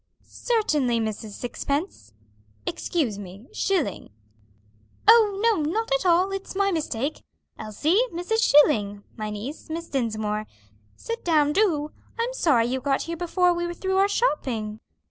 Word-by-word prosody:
"Certainly, 300 - 0
Mrs. 220 -1 -4
Sixpence." 265 - -4 0.5
"Excuse 250 - -1
me, 195 +3 -10
Schilling." 330 - -1 1.0
"Oh 430 -3 +6
no, 450 -7 +3
not 450 +5 -2
at - - +1
all, 360 +3 +4
it's 390 0 -5
my 395 0 +2
mistake. 295 -4 -2 0.4
Elsie, 300 - +1
Mrs. 355 +7 -1
Schilling. 210 - +4
My 215 -2 -4
niece, 220 +11 -7
Miss 330 +1 -5
Dinsmore. 215 -5 -2 0.5
Sit 460 0 -6
down, 300 -3 +3
do. 310 -7 +1 0.3
I'm 470 +2 -1
sorry 280 - +3
you 255 +2 -2
got 275 0 0
here 335 - -4
before 355 +1 +2
we 345 0 -2
were 345 - -5
through 380 +1 -1
our 390 +1 +5
shopping." 240 - -1
305 Hz, 140 wpm, -25 LUFS, 230-385 Hz, 1.0 s, Oh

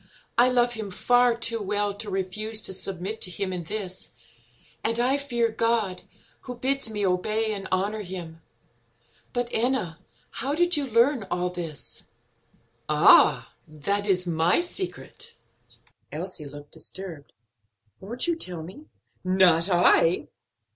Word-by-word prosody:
I 245 +2 +6
love 245 -1 +2
him 220 -3 -5
far 245 +5 +3
too 230 -1 +1
well 205 0 0
to 205 +1 -5
refuse 205 +3 -2
to 190 - -4
submit 195 +3 -4
to - - +1
him 185 +1 -2
in 175 -2 -5
this, 190 -1 -4 0.7
and 230 +1 +1
I 255 +3 +3
fear 240 -5 0
God, 220 -4 0 0.4
who 250 -1 -8
bids 270 0 0
me 210 -2 -2
obey 215 +4 +1
and 195 -2 -5
honor 200 +3 0
him. 175 -4 -8 0.9
But, 245 -1 -1
Enna, 225 -9 +1 0.3
how 275 +4 0
did 350 +2 +3
you 290 -2 0
learn 235 -1 +2
all 180 0 -1
this?" 170 -4 -7 0.9
"Ah, - - +5
that 200 +7 -2
is 185 -2 +1
my 165 0 +2
secret." 380 +6 -6 0.8
Elsie 165 0 -5
looked 145 +1 -12
disturbed. 160 -2 -8 0.7
"Won't 235 +6 -4
you 340 -1 +1
tell 180 - -5
me?" 195 - -11 0.4
"Not 185 -2 +4
I." 175 -1 +4
205 Hz, 135 wpm, -26 LUFS, 180-240 Hz, 0.9 s, I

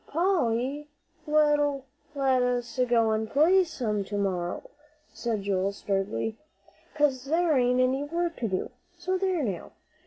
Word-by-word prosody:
"Polly'll 295 -5 0 0.4
let 290 -3 +1
us 245 0 -1
go 230 -2 +3
an' 220 0 -1
play 340 - +4
some 225 - -2
to 205 +1 -4
morrow," 180 -3 -2 0.4
said 225 -4 -3
Joel, 195 0 0
sturdily, 195 - -2 0.6
"'cause 280 -4 +1
there 325 +2 +2
ain't 250 -1 +3
any 260 +3 +1
work 335 +2 -2
to 230 - -2
do. 190 -2 -3 0.3
So 370 +2 -1
there 370 -5 0
now! 195 -8 -4
255 Hz, 130 wpm, -27 LUFS, 220-300 Hz, 0.6 s, play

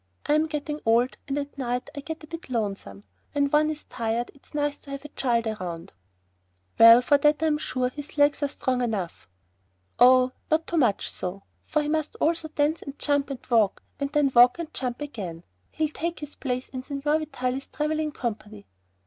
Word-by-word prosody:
I'm 305 +2 +3
getting 300 0 -4
old 235 +2 +3
and 275 0 -2
at 285 0 -4
night 250 +2 -2
I - - -4
get 320 +3 -7
a - - -10
bit 330 -1 -8
lonesome. 195 - -3 0.3
When 285 -1 +1
one 305 +1 +4
is 305 -1 -5
tired 230 0 -2
it's 280 +2 -18
nice 290 -1 -1
to - - -15
have 275 +1 -6
a - - -7
child 235 -4 0
around." 180 -6 -5 0.9
"Well, 230 +2 +9
for 285 +2 +4
that 300 +2 +3
I'm 305 -2 +2
sure 255 -4 -1
his 290 +3 -9
legs 290 +1 +4
are 285 - +2
strong 260 -2 -1
enough." 200 - -3 0.7
"Oh, 255 +1 +7 0.2
not 320 +1 +2
too 340 - -2
much 240 -9 +2
so, 190 +2 -5 0.2
for 305 -1 +1
he - - -3
must 310 0 -1
also 325 0 0
dance 305 +1 0
and 280 0 -8
jump 285 -1 +1
and 270 -3 -7
walk, 225 -5 +2 0.2
and 280 0 -2
then 295 -2 +2
walk 245 +1 +7
and 330 -2 -6
jump 250 0 -3
again. 190 - -6 0.3
He'll 310 -1 -1
take 335 +2 -4
his 295 -1 -6
place 255 -1 -3
in 255 - -5
Signor 290 +3 0
Vitalis' 270 -3 -3
traveling 305 0 -1
company." 215 - -5
280 Hz, 190 wpm, -26 LUFS, 240-300 Hz, 0.9 s, Well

